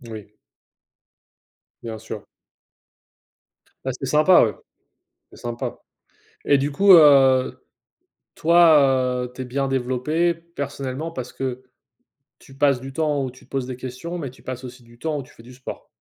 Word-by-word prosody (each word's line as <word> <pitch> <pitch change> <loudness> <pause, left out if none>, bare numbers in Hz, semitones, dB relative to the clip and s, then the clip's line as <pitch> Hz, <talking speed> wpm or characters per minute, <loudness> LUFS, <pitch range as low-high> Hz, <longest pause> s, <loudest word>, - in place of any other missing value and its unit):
Moui. 110 -4 -10 1.5
Bien 115 -1 -6
sûr. - - -8 1.6
Bah, 130 - -1
c'est 135 - -3
sympa 155 +7 +5
ouais. 110 - -2 0.8
C'est - - -16
sympa 120 0 -5 0.7
et 140 - +4
du 140 +2 -1
coup, 195 +7 +4
heu, 135 -5 +5 0.7
toi, 140 -7 +4
heu, 125 - -10
tu 130 - -7
es - - -4
bien 135 +2 -2
développé 135 +6 0
personnellement, 145 -3 -6
parce 130 -5 -7
que 130 -1 -4 0.8
tu 135 - -17
passes 140 -2 +3
du 135 +1 -9
temps 150 -2 0
où 130 - -5
tu 130 - -18
te - - -34
poses 135 -2 -2
des 130 - -5
questions, 130 +8 -6
mais 140 -7 -5
tu 130 - -19
passes 130 0 -6
aussi 125 0 -10
du 120 0 -19
temps 155 -2 -2
où 140 - -5
tu - - -19
fais 115 - -17
du 125 +2 -13
sport? 130 +1 -9
135 Hz, 160 wpm, -22 LUFS, 125-150 Hz, 1.6 s, sympa